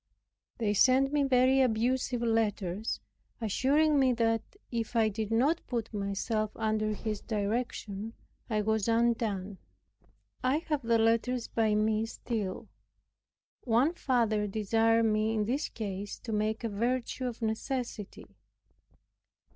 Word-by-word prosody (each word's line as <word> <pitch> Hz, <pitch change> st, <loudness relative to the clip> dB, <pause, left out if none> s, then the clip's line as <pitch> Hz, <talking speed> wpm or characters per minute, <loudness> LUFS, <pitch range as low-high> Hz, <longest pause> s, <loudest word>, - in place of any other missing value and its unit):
They 215 Hz, -3 st, 0 dB
sent 265 Hz, +6 st, +4 dB
me 295 Hz, -, +3 dB
very 260 Hz, 0 st, +4 dB
abusive 245 Hz, +1 st, +1 dB
letters, 215 Hz, -3 st, 0 dB, 0.4 s
assuring 280 Hz, +7 st, +2 dB
me 260 Hz, -2 st, +4 dB
that, 225 Hz, -1 st, +1 dB, 0.3 s
if 230 Hz, 0 st, -3 dB
I 225 Hz, -2 st, +4 dB
did 215 Hz, 0 st, -3 dB
not 270 Hz, +9 st, +2 dB
put 235 Hz, -3 st, -3 dB
myself 210 Hz, +2 st, -1 dB
under 215 Hz, -1 st, 0 dB
his 215 Hz, -1 st, -4 dB
direction, 215 Hz, -1 st, -3 dB, 0.4 s
I 215 Hz, -2 st, +1 dB
was 220 Hz, -1 st, 0 dB
undone. 225 Hz, -4 st, 0 dB, 0.8 s
I 255 Hz, +3 st, +3 dB
have 300 Hz, -2 st, +1 dB
the 230 Hz, -1 st, +2 dB
letters 230 Hz, +2 st, +1 dB
by 220 Hz, -2 st, +1 dB
me 215 Hz, +1 st, +1 dB
still. 215 Hz, -5 st, -4 dB, 1.0 s
One 250 Hz, +7 st, +3 dB
father 230 Hz, -9 st, +1 dB
desired 225 Hz, +2 st, +2 dB
me 215 Hz, 0 st, +1 dB
in 210 Hz, -1 st, +1 dB
this 265 Hz, +7 st, -1 dB
case 205 Hz, -2 st, -5 dB
to 230 Hz, -, -6 dB
make 215 Hz, +2 st, -1 dB
a 230 Hz, -, -1 dB
virtue 245 Hz, +4 st, -1 dB
of 235 Hz, -1 st, -6 dB
necessity. 225 Hz, -1 st, -3 dB
225 Hz, 125 wpm, -30 LUFS, 215-245 Hz, 1.0 s, sent